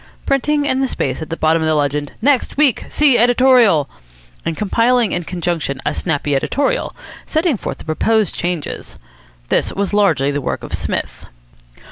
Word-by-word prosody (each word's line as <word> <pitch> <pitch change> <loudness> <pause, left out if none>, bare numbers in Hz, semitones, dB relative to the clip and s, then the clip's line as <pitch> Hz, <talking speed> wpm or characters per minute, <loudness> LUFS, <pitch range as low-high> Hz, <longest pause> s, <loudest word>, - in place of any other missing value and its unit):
printing 290 +2 +1
in 260 -2 +1
the 265 - +1
space 135 - -3
at 160 - -6
the 165 - -4
bottom 160 +1 +2
the 160 0 +1
legend, 145 0 -1
"Next 275 -2 +1
Week! 285 -5 +2
See 285 -5 +3
Editorial!" 240 - +4 0.6
and 165 - -3
compiling 230 +2 +2
in 175 -1 -2
conjunction 170 -6 -3
a - - 0
snappy 145 -3 -1
editorial, 285 - -1 0.3
setting 315 -2 +1
forth - - -5
the - - -13
proposed 215 +6 +1
changes. 175 -3 -4 0.5
This - - +1
was 200 0 -2
largely 160 -10 +2
the 145 0 -2
work - - -3
of - - -8
Psmith. - - -4
195 Hz, 160 wpm, -18 LUFS, 155-255 Hz, 0.6 s, Editorial